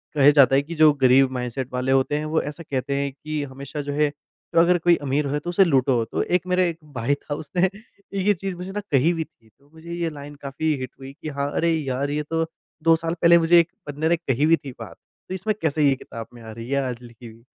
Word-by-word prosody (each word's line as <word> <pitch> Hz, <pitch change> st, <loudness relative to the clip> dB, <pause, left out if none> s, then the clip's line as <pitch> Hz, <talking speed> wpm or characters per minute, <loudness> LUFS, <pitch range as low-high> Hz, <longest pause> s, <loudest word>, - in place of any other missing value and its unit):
कहे 145 Hz, 0 st, +7 dB
जाता 135 Hz, -2 st, +6 dB
है 140 Hz, -, +4 dB
कि 165 Hz, +4 st, -8 dB
जो 155 Hz, -1 st, +7 dB
गरीब 130 Hz, +1 st, +6 dB
माइंडसेट 125 Hz, 0 st, -4 dB
वाले 125 Hz, +1 st, 0 dB
होते 135 Hz, +2 st, +2 dB
हैं 150 Hz, -, -3 dB
वो 160 Hz, -, +2 dB
ऐसा 150 Hz, +3 st, -7 dB
कहते 140 Hz, -1 st, -3 dB
हैं 140 Hz, 0 st, -1 dB
कि 150 Hz, +2 st, -4 dB
हमेशा 140 Hz, +2 st, -6 dB
जो 145 Hz, 0 st, -4 dB
है 150 Hz, 0 st, +2 dB, 0.4 s
तो 165 Hz, -, +5 dB
अगर 175 Hz, +1 st, +5 dB
कोई 175 Hz, 0 st, +4 dB
अमीर 140 Hz, +1 st, 0 dB
है 150 Hz, -, 0 dB
तो 175 Hz, -, -6 dB
उसे 185 Hz, +2 st, +5 dB
लूटो। 130 Hz, -6 st, +2 dB
तो -, -, -2 dB
एक 180 Hz, 0 st, 0 dB
मेरे 180 Hz, 0 st, +2 dB
एक 165 Hz, -, -6 dB, 0.2 s
भाई 120 Hz, +3 st, 0 dB
था 145 Hz, -, -7 dB
उसने 180 Hz, +5 st, 0 dB, 0.5 s
ये 205 Hz, +1 st, +4 dB
चीज़ 190 Hz, 0 st, -5 dB
मुझे 185 Hz, +2 st, -6 dB
ना 210 Hz, -, -3 dB
कहीं 145 Hz, +6 st, +4 dB
भी 165 Hz, -1 st, -2 dB
थी 115 Hz, -6 st, -25 dB
तो 140 Hz, +7 st, -30 dB
मुझे 165 Hz, +1 st, -9 dB
ये 170 Hz, -1 st, -1 dB
लाइन 145 Hz, -1 st, -9 dB
काफ़ी 150 Hz, +3 st, -1 dB
हिट 130 Hz, -1 st, -5 dB
हुई 135 Hz, +1 st, -9 dB
कि 155 Hz, -, -4 dB
हाँ 140 Hz, 0 st, 0 dB
अरे! 170 Hz, -, +1 dB
यार 140 Hz, -3 st, -1 dB
ये 150 Hz, +1 st, -1 dB
तो 165 Hz, +2 st, -1 dB, 0.4 s
2 165 Hz, 0 st, +6 dB
साल 165 Hz, +1 st, -2 dB
पहले 170 Hz, 0 st, +7 dB
मुझे 170 Hz, +1 st, +5 dB
एक 170 Hz, -, +2 dB, 0.2 s
बंदे 155 Hz, +3 st, -1 dB
ने 170 Hz, -, +4 dB
कही 145 Hz, -3 st, 0 dB
भी 165 Hz, +1 st, +6 dB
थी 135 Hz, -, -5 dB
बात। 115 Hz, -, -8 dB, 0.3 s
तो -, -, -3 dB
इसमें 215 Hz, +4 st, -1 dB
कैसे 150 Hz, -2 st, +2 dB
ये 135 Hz, -, +2 dB
किताब 115 Hz, -3 st, -9 dB
में 120 Hz, -, -13 dB
आ 110 Hz, -1 st, -9 dB
रही 115 Hz, +2 st, -8 dB
है 140 Hz, 0 st, +1 dB
आज 125 Hz, -2 st, -4 dB
लिखी 120 Hz, 0 st, -13 dB
हुई। 115 Hz, +1 st, -15 dB
145 Hz, 260 wpm, -23 LUFS, 135-165 Hz, 0.5 s, कहे